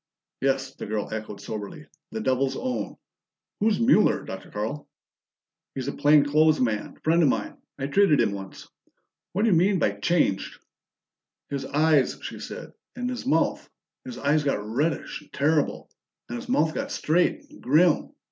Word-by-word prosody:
"Yes," 135 0 0
the - - -7
girl 105 0 -3
echoed 110 -2 -6
soberly. 105 -2 -7 0.3
"The 110 - -4
Devil's 130 +3 +1
own! 255 -1 -3 0.6
Who's 210 -1 +2
Mueller, 230 -3 +4
Dr. 95 - -8
Carl?" 110 +8 -4 0.9
"He's 130 - -4
a - - 0
plain 145 0 +5
clothes 155 +2 +4
man, 110 -4 -1
friend 165 +2 +3
of 150 - +5
mine. - - -2 0.2
I 135 - -3
treated 150 +1 +4
him - - +3
once. 95 -1 -8 0.7
What 200 +5 +1
do 225 - +3
you - - +5
mean 190 +4 +3
by 125 - +2
changed?" 100 - 0 0.9
"His 140 -1 -3
eyes," 150 -1 +3
she - - -6
said. - - -8 0.2
"And 250 0 -3
his 250 0 -5
mouth. - - +1 0.3
His 255 -3 -8
eyes 150 +2 +2
got 135 -8 -1
reddish 145 +10 -1
and 150 - -21
terrible, 150 +1 0 0.4
and - - -5
his 240 - -10
mouth 160 - +2
got - - -3
straight 170 +4 +1
and - - -15
grim. 155 +5 +3
145 Hz, 165 wpm, -25 LUFS, 125-175 Hz, 0.9 s, plain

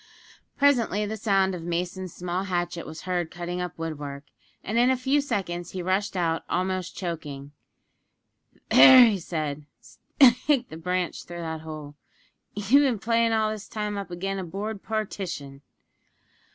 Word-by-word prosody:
Presently 235 -7 +3
the 215 +1 -4
sound 195 -3 +2
of 180 - -5
Mason's 175 +2 -3
small 180 +3 -3
hatchet 175 -2 -2
was 160 0 -8
heard 180 -3 -1
cutting 175 +1 -5
up 180 -2 -5
woodwork, 145 -4 -5 0.4
and 225 +3 0
in 245 +1 +5
a 260 - +2
few 270 +3 +2
seconds 185 - -3
he 185 -1 -4
rushed 190 +2 0
out 165 -2 0
almost 185 0 -2
choking. 145 -6 -5 1.2
"There," 250 -5 +9
said 155 -4 -4 0.6
he, 275 - +10
"stick 255 +1 0
the 160 - -8
branch 180 +2 -2
through 175 0 -7
that 160 -1 -4
hole. 155 -2 -8 0.6
You've 210 +8 +4
bin 260 -5 +2
playin' 230 +2 +1
all 220 -1 +2
this 215 -1 -7
time 210 -1 -3
up 200 -2 -5
agin' 195 +3 -3
a - - -3
board 200 +4 -5
partition!" 185 -10 -4
185 Hz, 150 wpm, -26 LUFS, 170-215 Hz, 1.2 s, he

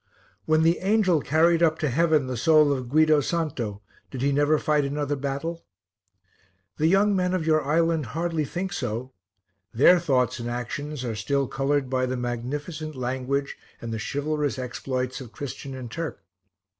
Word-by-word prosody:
When 155 0 +3
the 165 +2 +3
angel 190 -5 +2
carried 165 +4 +3
up 160 -2 +3
to 155 - -1
heaven 155 +1 +2
the 130 -1 -3
soul 150 +2 +4
of 130 -3 -4
Guido 155 +1 +4
Santo, 130 - -3 0.3
did 130 -1 -5
he 140 - +2
never 145 +2 +3
fight 150 -1 +1
another 145 +1 -1
battle? 140 +5 -4 1.1
The 155 - +2
young 200 +3 +4
men 180 0 +1
of 170 -4 -2
your 155 -1 +3
island 160 0 +1
hardly 165 -2 0
think 180 +6 -4
so; 125 +2 -4 0.6
their 175 +9 +6
thoughts 130 -6 +1
and 120 0 -4
actions 130 +3 -4
are 115 - -2
still 135 +6 0
coloured 135 +1 0
by 130 0 0
the 130 0 -2
magnificent 145 +6 -4
language 130 +2 -2 0.2
and 115 -1 -5
the 110 - -3
chivalrous 145 +2 -2
exploits 130 0 -3
of 120 -4 -10
Christian 135 0 -7
and 125 -3 -7
Turk. 165 +3 -5
145 Hz, 165 wpm, -25 LUFS, 130-160 Hz, 1.1 s, their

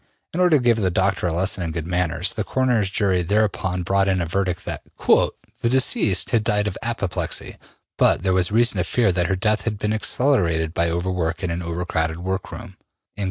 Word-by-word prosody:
'' - - -51
In 170 - -3
order 180 -4 +5
to 130 - -3
give 120 -2 +3
the 95 -4 +1
doctor 95 0 0
a - - -1
lesson 90 +3 0
in 85 -2 -3
good 80 -1 -4
manners, 90 -1 -1
the - - -2
coroner's 125 -6 +1
jury 95 -2 +1
thereupon 95 -1 0
brought 95 +2 +1
in 95 -1 +1
a 85 - -1
verdict 90 +1 -2
that - - -4 0.2
``the - - +3 0.4
deceased 115 -7 +2
had 115 -3 +2
died 105 -1 +1
of 105 -3 -3
apoplexy, 115 -6 -2 0.4
but - - +3
there 95 -1 +2
was 90 -1 +2
reason 120 +2 +3
to - - +1
fear 115 -6 +1
that 90 -1 0
her 95 - 0
death 105 +2 +1
had 105 +1 -3
been 105 +1 -1
accelerated 90 - +1
by 85 0 +1
over 85 +2 -2
work 80 -3 -2
in 90 - -1
an 85 +1 -3
over 85 +1 -4
crowded 80 -1 -1
workroom, 95 +1 -6 0.4
&c.'' - - -13
95 Hz, 215 wpm, -22 LUFS, 85-105 Hz, 0.4 s, order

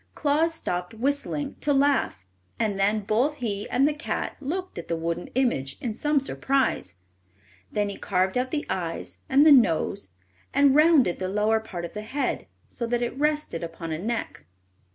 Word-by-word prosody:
Claus 315 +3 +2
stopped 180 - -3
whistling 285 +3 -1
to 295 - 0
laugh, 275 - +2 0.3
and 210 -3 0
then 210 +2 +2
both 235 +9 +1
he 210 -7 -3
and 270 +3 +3
the 300 - +1
cat 300 - -3
looked 350 - -4
at 170 - -8
the 170 - -1
wooden 165 +1 -3
image 140 - 0
in 235 -4 -3
some 295 +5 +1
surprise. 270 - 0 0.8
Then 205 -1 0
he 200 - -5
carved 190 -1 0
out 250 +1 0
the 295 +2 -2
eyes 175 -3 -4
and 275 +3 +6
the 310 - +8
nose, 165 - +3 0.5
and 280 -1 +5
rounded 300 - +5
the 185 0 -2
lower 210 +3 +2
part 185 -6 -6
of 170 - -9
the 210 - -5
head 270 +7 -2 0.2
so 235 - -3
that 240 +1 0
it 240 - -3
rested 300 - 0
upon 165 0 -6
a 155 - -2
neck. 215 - -4
235 Hz, 175 wpm, -26 LUFS, 185-285 Hz, 0.8 s, the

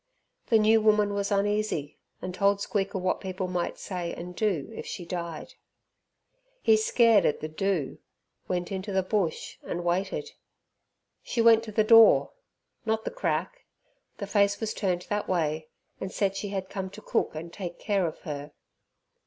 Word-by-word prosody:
The 225 - +5
new 220 +1 +5
woman 210 -1 +3
was 200 0 -1
uneasy, 200 -7 0 0.2
and 185 - -4
told 200 +1 +2
Squeaker 200 0 -1
what 185 0 -1
people 185 -1 -3
might 180 -1 -2
say 175 -3 -4
and 180 +1 -8
do 195 -6 -1
if - - -7
she 180 - -6
died. 170 -2 -5 1.1
He 220 - +6
scared 220 -1 +4
at - - +1
the 155 - -4
"do", 160 -2 -2 0.5
went 180 0 -2
into 195 +1 -4
the 190 -1 +1
bush 185 -4 -2
and 175 0 -4
waited. 190 - -1 0.9
She - - -4
went 230 -1 +6
to 215 - -7
the 215 +1 +3
door, 225 0 +7 0.5
not 220 -1 -1
the - - -2
crack, - - -2 0.5
the 200 - -4
face 200 0 +2
was 220 -1 -2
turned 180 -3 -1
that 205 +2 -3
way, 155 -3 0 0.3
and 190 - -4
said 195 -1 0
she 205 - -3
had 190 -1 -3
come 190 -1 -5
to 210 +3 -11
cook - - 0
and 165 +2 -7
take 175 -4 -6
care 200 -4 0
of 160 - -7
her. 145 -1 -6
195 Hz, 170 wpm, -27 LUFS, 175-215 Hz, 1.1 s, door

